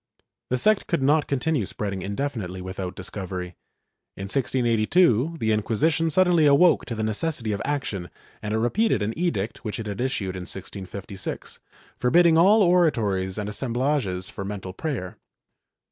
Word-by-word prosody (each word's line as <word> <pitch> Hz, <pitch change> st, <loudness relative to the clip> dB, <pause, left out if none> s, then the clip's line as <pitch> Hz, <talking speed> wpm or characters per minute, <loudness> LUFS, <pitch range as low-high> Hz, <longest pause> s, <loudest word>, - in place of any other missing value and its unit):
^ -, -, -40 dB, 0.3 s
The 125 Hz, -, +1 dB
sect 215 Hz, -, +3 dB
could 170 Hz, -6 st, 0 dB
not 150 Hz, +3 st, +3 dB
continue 140 Hz, -, 0 dB
spreading 100 Hz, -3 st, -4 dB
indefinitely 100 Hz, -2 st, -3 dB
without 95 Hz, 0 st, -5 dB
dis 95 Hz, -, -8 dB
covery. 95 Hz, -2 st, -5 dB, 0.7 s
In 95 Hz, -, -5 dB
1682 125 Hz, -, +2 dB
the 110 Hz, -, +1 dB
Inquisition 145 Hz, +10 st, +1 dB
suddenly 175 Hz, -2 st, +4 dB
awoke 145 Hz, +5 st, +5 dB
to 115 Hz, -, -4 dB
the 110 Hz, -, -2 dB
necessity 110 Hz, +1 st, -1 dB
of 100 Hz, -, -2 dB
action 130 Hz, -11 st, -3 dB, 0.3 s
and 105 Hz, -, -4 dB
it -, -, +1 dB
repeated 120 Hz, -, +1 dB
an 110 Hz, +2 st, -2 dB
edict 115 Hz, -, -2 dB
which 105 Hz, -1 st, -4 dB
it 110 Hz, -, -5 dB
had 105 Hz, +1 st, -4 dB
issued 110 Hz, -8 st, -2 dB
in 90 Hz, -1 st, -6 dB
1656, 95 Hz, 0 st, -6 dB, 0.4 s
forbidding 165 Hz, +6 st, +5 dB
all 200 Hz, +6 st, +6 dB
oratories 110 Hz, -, +2 dB
and 105 Hz, -1 st, -3 dB
assemblages 120 Hz, -4 st, -1 dB
for 100 Hz, -, -6 dB
mental 95 Hz, -2 st, -6 dB
prayer. 120 Hz, -, -4 dB
115 Hz, 155 wpm, -24 LUFS, 100-150 Hz, 0.7 s, all